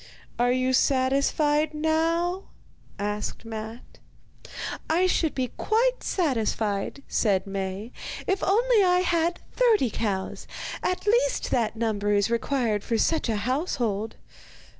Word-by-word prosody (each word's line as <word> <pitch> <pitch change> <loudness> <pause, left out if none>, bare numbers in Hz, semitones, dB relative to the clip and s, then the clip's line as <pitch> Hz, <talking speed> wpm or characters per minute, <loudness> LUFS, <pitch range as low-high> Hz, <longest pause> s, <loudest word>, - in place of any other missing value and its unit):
'Are 245 +1 +3
you 255 +1 +1
satisfied 280 +4 +2
now?' 330 +4 0 0.5
asked 210 +2 -3
Matte. 220 +1 -8 0.9
'I 340 +4 +3
should 335 -4 +1
be 255 -2 -1
quite - - +1
satisfied,' 225 - -1
said 200 -4 +1
Maie, 195 +3 -4 0.3
'if 385 0 0
only 450 +2 +4
I 360 -1 +4
had 340 -1 0
thirty 440 - +3
cows. 195 -4 -3 0.3
At 365 +2 -1
least 485 +4 +2
that 230 -3 +1
number 210 -2 0
is 205 +2 +2
required 235 -3 0
for 230 - 0
such 315 +2 +1
a 220 - +1
household. 240 - -1
260 Hz, 120 wpm, -26 LUFS, 220-345 Hz, 0.9 s, only